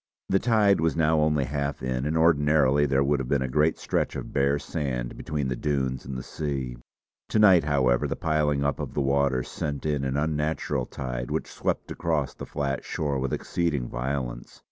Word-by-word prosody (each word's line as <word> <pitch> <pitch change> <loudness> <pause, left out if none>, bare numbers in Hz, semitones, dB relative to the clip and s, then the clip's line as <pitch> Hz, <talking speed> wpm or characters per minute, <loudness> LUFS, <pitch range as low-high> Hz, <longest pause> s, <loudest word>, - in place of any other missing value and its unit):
The 95 - +3
tide 105 -6 +3
was 80 -1 +1
now 80 -1 +3
only 75 -2 +2
half 70 0 -3
in, 65 +2 -1
and 80 +2 0
ordinarily 75 -3 +4
there 70 0 +2
would 70 0 +1
have 65 - -3
been 70 -2 +2
a - - -1
great 75 +5 +2
stretch - - -1
of - - -6
bare 70 +1 +2
sand 65 -5 -3
between 75 -3 -3
the 65 - -1
dunes 65 -2 -1
and 65 -1 -4
the 65 - -5
sea. 70 -5 -4 0.5
To - - 0
night, 95 -7 +6
however, 65 -5 +2
the - - -2
piling 75 -3 +1
up 70 0 0
of - - -5
the - - 0
waters 70 -2 +1
sent 70 -1 -4
in 75 -3 0
an 65 +1 -1
unnatural 75 -3 -1
tide 60 -2 -5
which - - -1
swept - - -2
across 80 -5 -1
the - - -8
flat 70 -1 -2
shore 70 -3 -2
with 65 0 -2
exceeding 75 -8 -1
violence. - - -4
70 Hz, 195 wpm, -26 LUFS, 65-75 Hz, 0.5 s, night